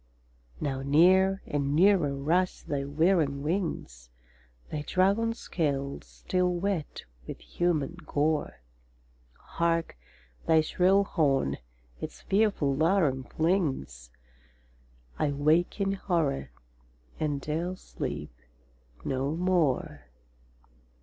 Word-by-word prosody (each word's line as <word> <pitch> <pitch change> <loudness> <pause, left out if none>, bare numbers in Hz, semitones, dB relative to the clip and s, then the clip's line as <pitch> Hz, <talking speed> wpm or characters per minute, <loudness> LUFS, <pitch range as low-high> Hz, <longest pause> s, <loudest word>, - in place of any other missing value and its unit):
Now 135 -2 -2
near 185 +7 +4
and 140 -1 -1
nearer 175 -5 +4
rush 170 +7 0
thy 140 -2 -3
whirring 145 -1 +1
wings, 150 - -3 0.6
Thy 150 - -2
dragon 200 +8 +1
scales 140 -9 -3
still 180 -1 -1
wet 180 -3 -3 0.2
with - - -7
human 170 -2 -1
gore. 145 - -1 0.7
Hark, 165 - -1 0.5
thy 160 -1 +5
shrill 185 +5 +3
horn 140 - +1 0.4
its - - -7
fearful 195 -9 +1
laram 155 -5 +1
flings! 140 - -1 1.1
—I 145 -2 +1
wake 155 +7 +2
in 195 -1 +1
horror, 170 -8 -1 0.7
and 145 -2 -1
'dare 165 +6 -3
sleep 70 - -6 0.7
no 135 +3 -1
more! 165 - 0
155 Hz, 95 wpm, -28 LUFS, 140-185 Hz, 1.1 s, thy